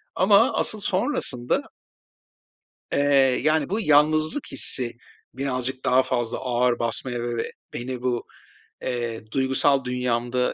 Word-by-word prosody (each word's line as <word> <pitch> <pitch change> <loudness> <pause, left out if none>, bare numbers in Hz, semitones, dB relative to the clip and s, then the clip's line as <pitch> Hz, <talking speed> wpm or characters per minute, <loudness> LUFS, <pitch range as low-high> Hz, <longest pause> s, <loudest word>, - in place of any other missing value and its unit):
Ama 200 +1 +4
asıl 215 - -2
sonrasında 185 - -1 1.3
eee, 135 -2 +3
yani, 155 -1 +1
bu 210 +4 -1
yalnızlık 155 - +2
hissi 125 -3 +4 0.4
birazcık 130 -1 -3
daha 130 +1 +4
fazla 125 -2 -2
ağır 125 -1 0
basmaya 120 +1 -1
ve 120 0 -3
ve 115 - -4 0.2
beni 125 0 -5
bu, 125 -2 -2 0.6
eee, 120 -3 -3
duygusal 135 +1 +2
dünyamda 125 0 -1
130 Hz, 115 wpm, -24 LUFS, 120-145 Hz, 1.3 s, Ama